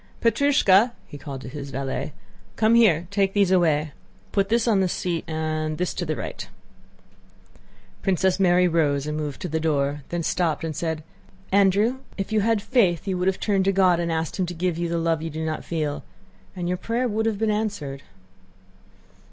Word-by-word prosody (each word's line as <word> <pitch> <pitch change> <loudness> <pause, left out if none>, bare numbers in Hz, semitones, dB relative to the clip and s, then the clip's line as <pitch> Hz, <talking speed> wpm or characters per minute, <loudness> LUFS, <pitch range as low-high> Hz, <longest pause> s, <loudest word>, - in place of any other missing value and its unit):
Petrúshka!" 235 -3 +4
he - - -12
called 135 -2 -7
to - - -9
his 140 +2 -7
valet: 135 +2 -3 0.4
"Come 220 +1 +3
here, 190 -8 +5
take 195 -1 +1
these 200 -3 +3
away. 155 -5 +2 0.4
Put 195 -1 +1
this 235 +1 +2
on 215 -4 +3
the 190 -1 +2
seat 175 -1 -2
and 155 -1 -2
this 180 0 -1
to 175 - -4
the 155 - -1
right." - - -6 1.5
Princess 190 0 +1
Mary 180 -1 +4
rose 145 -4 +1
and 150 0 -3
moved 150 -3 -4
to - - -2
the 160 -1 -1
door, 145 -2 0
then 175 -1 -2
stopped 165 -1 0
and 160 -2 -3
said: 160 0 -3 0.5
"Andrew, 200 +5 +3 0.2
if 195 +1 -4
you 220 - +3
had 220 -1 +1
faith 200 - +2
you 190 - 0
would 180 - 0
have 190 - +1
turned 195 -3 +1
to 195 - +4
God 185 -3 +3
and 170 -1 -1
asked 160 +3 -2
Him 185 - +1
to 175 - -6
give 175 0 -1
you 170 -1 -1
the 170 - -1
love 165 -1 0
you 165 - -4
do 160 +1 -4
not 155 -1 -3
feel, 155 -3 -3 0.5
and 175 -1 -3
your 180 +1 0
prayer 235 +6 -1
would 220 0 0
have 220 -2 0
been 220 +1 +1
answered." 200 -11 -3
175 Hz, 195 wpm, -24 LUFS, 155-200 Hz, 1.5 s, here